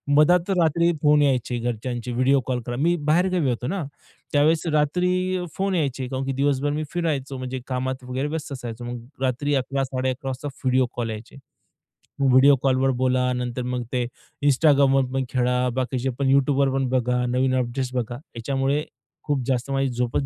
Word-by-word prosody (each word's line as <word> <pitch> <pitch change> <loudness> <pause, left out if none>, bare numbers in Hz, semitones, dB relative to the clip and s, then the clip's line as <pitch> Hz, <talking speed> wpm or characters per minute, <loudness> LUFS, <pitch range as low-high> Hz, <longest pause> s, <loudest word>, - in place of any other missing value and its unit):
मधात 175 +5 +4
रात्री 170 -2 +3
फोन 150 -1 +5
यायचे 125 -3 +1
घरच्यांचे 120 +1 -3
व्हिडिओ 130 +3 +3
कॉल. 125 -2 -1
कारण 120 +1 -4
मी 170 +3 +3
बाहेरगावी 175 -2 +2
होतो 125 0 -2
ना. 185 +3 -2 0.5
त्यावेळेस 155 +3 +3
रात्री 180 +4 +1
फोन 195 0 0
यायचे 135 -5 -1
कारण 130 +1 -3
की 135 - -1
दिवसभर 140 +1 +1
मी 155 +1 -2
फिरायचो, 140 -6 -2
म्हणजे 130 0 -4
कामात 130 0 -3
वगैरे 130 +3 -3
व्यस्त 155 -1 -5
असायचो, 120 -2 -7
मग 120 0 -5 0.2
रात्री 135 +3 0
11.00-11.30 130 0 -2
वाजता 135 +3 -5 0.2
व्हिडिओ 130 0 +3
कॉल 120 -2 -2
यायचे. 110 +1 -8 0.8
व्हिडिओ 135 +1 +6
कॉलवर 135 0 +3
बोला, 125 0 +2
नंतर 125 0 -3
मग 125 0 -2
ते 125 -1 +1 0.4
Instagramवर 140 -1 +4
पण 135 0 0
खेळा, 125 0 +1
बाकीचे 130 0 -1
पण 135 -1 +2
YouTubeवर 140 0 +3
पण 135 -1 0
बघा, 125 -1 +1
नवीन 130 +1 +1
अपडेट्स 125 +1 -2
बघा, 120 -1 -2 0.2
याच्यामुळे 135 +4 0 0.4
खूप 145 -3 0
जास्त 130 0 -1
माझी 135 0 +1
झोपच 125 +3 -1
135 Hz, 165 wpm, -24 LUFS, 125-145 Hz, 0.8 s, व्हिडिओ